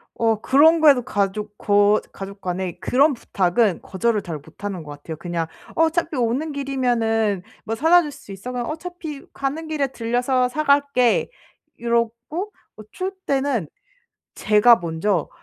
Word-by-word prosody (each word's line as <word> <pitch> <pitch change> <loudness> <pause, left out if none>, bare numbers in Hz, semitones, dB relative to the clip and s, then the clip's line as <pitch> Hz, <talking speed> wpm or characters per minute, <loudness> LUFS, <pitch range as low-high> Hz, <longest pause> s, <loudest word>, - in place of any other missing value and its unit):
어 225 -2 +1
그런 315 +5 +5
거에도 280 -5 +6
가족 205 -2 -2
거 205 +1 +3
가족 200 +1 -9
간에 180 -1 -3
그런 280 +4 +3
부탁은 200 -3 +1
거절을 210 +3 0
잘 165 -4 -5
못하는 170 +5 -7
것 150 - -9
같아요. 145 +2 -8
그냥 170 0 -3 0.3
"어차피 325 0 +1
오는 250 +6 0
길이면은 235 -8 0 0.2
뭐 225 - -2
사다 325 +8 +5
줄 300 -3 -5
수 205 - -13
있어?" 195 +6 -7
그러면 245 +2 -3
"어차피 320 -3 -7
가는 290 +4 -3
길에 305 -3 0
들려서 250 +1 0
사 305 +5 -2
갈게." 280 -4 +3 0.5
이러고 235 - -2 0.3
어 - - -9
추울 375 +1 -3 0.2
때는 270 - 0 0.7
제가 215 +3 +5
먼저 170 0 -1
235 Hz, 290 characters per minute, -22 LUFS, 200-280 Hz, 0.7 s, 거에도